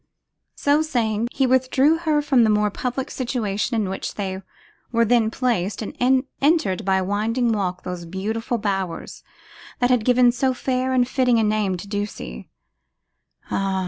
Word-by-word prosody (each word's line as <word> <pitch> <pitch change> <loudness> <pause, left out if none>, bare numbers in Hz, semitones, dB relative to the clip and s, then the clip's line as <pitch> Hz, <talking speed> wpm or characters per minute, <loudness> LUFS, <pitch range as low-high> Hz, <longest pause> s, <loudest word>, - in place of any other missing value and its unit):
So 290 +2 +2
saying, 235 -7 0
he 270 - +1
withdrew 260 +5 +3
her 310 -3 +1
from 265 -4 +4
the 220 - +3
more 210 0 +2
public 255 +4 -3
situation 235 -3 -2
in 205 - -1
which 190 +1 -5
they 190 -2 -4 0.5
were 230 -1 +3
then 230 -1 +3
placed, 220 -5 -1
and - - -7 0.5
entered, 280 - +2
by 190 0 +2
a 190 - 0
winding 225 +5 0
walk, 190 -4 -2
those 180 -1 -5
beautiful 220 +6 -2
bowers 195 -5 -3 0.5
that 245 0 +2
had 245 -3 +3
given 245 0 +5
so 260 +1 0
fair 255 0 -1
and 250 -1 +2
fitting 250 -2 +2
a 225 - +3
name 210 -3 0
to 190 - -9
Ducie. 205 - -5 1.0
Ah! 195 -1 0
225 Hz, 160 wpm, -22 LUFS, 200-255 Hz, 1.0 s, given